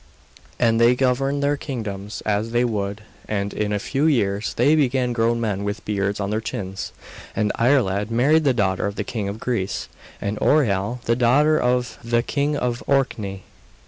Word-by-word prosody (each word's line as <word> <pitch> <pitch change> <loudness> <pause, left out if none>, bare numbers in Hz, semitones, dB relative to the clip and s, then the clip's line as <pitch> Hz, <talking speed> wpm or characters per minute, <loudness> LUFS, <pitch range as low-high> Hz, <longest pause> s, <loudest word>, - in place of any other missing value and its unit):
And 115 -1 +3
they 120 +1 +6
governed 135 +2 +1
their 145 +1 +2
kingdoms 105 -8 -5
as 105 +1 0
they 120 +1 +2
would, 105 -2 -3 0.2
and 100 -1 -2
in 105 -1 -1
a 105 - +1
few 140 +8 0
years 105 -8 +1
they 150 - +4
became 130 -4 +1
grown 115 0 +1
men 105 -4 -1
with 100 +2 -4
beards 100 -1 -1
on 100 0 -2
their 110 +1 0
chins; 95 -3 -5 0.4
and 105 -2 +1
Iarlaid 115 -5 +2
married 140 +8 +3
the 140 - +4
daughter 100 -6 0
of 100 - -4
the - - -2
king 105 -4 -3
of 105 +2 -6
Greece, 115 -7 -2 0.3
and 100 +1 -3
Oireal 120 -4 +1
the 115 - +2
daughter 145 +6 +3
of 125 0 0
the 115 0 +1
king 145 +3 0
of 120 -2 -2
Orkney. 105 -8 0
115 Hz, 175 wpm, -22 LUFS, 100-125 Hz, 0.4 s, they